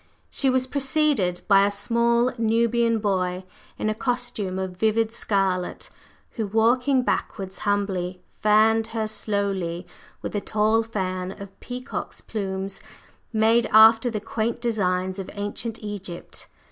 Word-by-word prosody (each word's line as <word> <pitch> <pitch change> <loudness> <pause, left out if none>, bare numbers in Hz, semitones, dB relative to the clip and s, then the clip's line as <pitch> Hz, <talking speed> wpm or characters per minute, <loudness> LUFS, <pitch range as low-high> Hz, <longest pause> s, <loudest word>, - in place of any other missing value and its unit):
She 270 - +1
was 255 0 +2
preceded 270 - +1
by 195 -1 +6
a 200 - +3
small 235 +4 +1
Nubian 230 +1 +2
boy 185 -3 -1 0.3
in - - -2
a 215 - +1
costume 240 -5 -2
of 190 -1 -4
vivid 220 +3 +1
scarlet, 195 -5 -1 0.4
who, 220 -3 -3
walking 245 +5 +3
backwards 190 -5 -2
humbly, 190 -3 -1 0.2
fanned 220 +1 +4
her 220 - 0
slowly 195 -5 -2 0.4
with - - -4
a 205 - 0
tall 215 +2 +2
fan 185 -4 -4
of 200 -1 -11
peacock's 250 0 -6
plumes 195 -2 -4 0.5
made 225 +1 +3
after 225 +2 +7
the 220 -2 -3
quaint 225 +2 -2
designs 190 -5 -1
of 190 - -6
ancient 205 +2 -3
Egypt. 200 -4 -6
215 Hz, 130 wpm, -24 LUFS, 195-230 Hz, 0.5 s, after